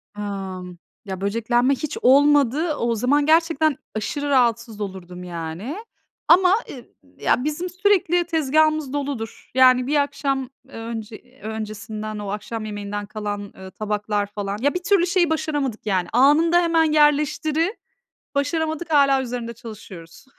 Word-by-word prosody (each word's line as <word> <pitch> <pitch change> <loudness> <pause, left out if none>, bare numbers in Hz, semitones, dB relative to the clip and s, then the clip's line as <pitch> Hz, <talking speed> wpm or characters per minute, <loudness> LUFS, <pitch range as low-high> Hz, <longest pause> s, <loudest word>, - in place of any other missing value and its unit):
Amm, 190 -3 -6 0.3
ya, 190 -1 -6
böceklenme 240 +5 +1
hiç 305 +2 -5
olmadı. 290 +3 +4
O 235 -3 0
zaman 285 +6 +2
gerçekten 315 -2 +3 0.2
aşırı 285 +7 -3
rahatsız 235 -4 +1
olurdum, 180 -2 -7
yani, 175 - -6 0.5
ama, 365 +1 +6 0.2
ııı, 250 -3 -10 0.3
ya, 250 - +1
bizim 305 +5 -2
sürekli 360 -2 +2
tezgâhımız 310 -2 +1
doludur. 275 -6 -5
Yani, 255 -1 +5
bir 295 - 0
akşam, 275 -2 0 0.2
eee, - - -18
önce 230 +3 -8
öncesinden 215 0 -5
o 205 -1 -5
akşam 215 +2 -5
yemeğinden 205 0 -5
kalan, 205 -1 -5
eee, 190 0 -11
tabaklar 210 0 -2
falan. 205 -1 -4
Ya, 285 +2 +2
bir 360 0 -4
türlü 380 -3 +3
şeyi 350 -3 +2
başaramadık, 290 -8 -2
yani, 185 -4 0
anında 315 +7 +5
hemen 325 -2 +2
yerleştiri 305 +5 +2 0.6
başaramadık, 315 +3 -1
hâlâ 275 -2 +4
üzerinde 240 -2 -5
çalışıyoruz. 210 -6 -11
255 Hz, 130 wpm, -22 LUFS, 210-305 Hz, 0.6 s, ama